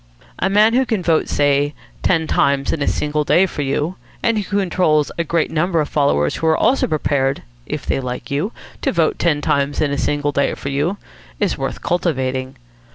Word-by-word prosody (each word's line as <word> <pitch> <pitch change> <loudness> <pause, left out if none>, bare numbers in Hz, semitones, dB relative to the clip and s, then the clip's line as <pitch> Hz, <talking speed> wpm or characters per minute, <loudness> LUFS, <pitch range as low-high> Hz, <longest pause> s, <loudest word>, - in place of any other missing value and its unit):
A 190 - +1
man 210 +3 +4
who 260 +2 +4
can 220 -7 -1
vote, 165 -2 +2
say, 145 0 +2 0.3
ten 165 -3 +2
times 140 -2 +1
in 160 - -3
a - - 0
single 150 0 0
day 180 +5 +4
for 170 - -4
you, 145 +6 -1 0.3
and 230 -2 +2
who 205 0 -2
controls 175 -6 +2
a - - +2
great 165 -1 0
number 170 +2 +1
of 150 - -1
followers 75 - +1
who 160 - -1
are 160 - +4
also 270 - +2
prepared, 140 -3 0 0.2
if - - -4
they - - 0
like 125 +1 -5
you, 150 +10 -1 0.3
to - - +1
vote 430 - +1
ten 150 -4 +1
times 140 0 0
in 150 -2 +1
a 140 - -1
single 145 0 0
day 140 0 0
for 140 - -5
you, 145 +8 -1 0.4
is 205 -4 +1
worth 135 0 -4
cultivating. 130 -6 -1
150 Hz, 200 wpm, -19 LUFS, 140-180 Hz, 0.4 s, man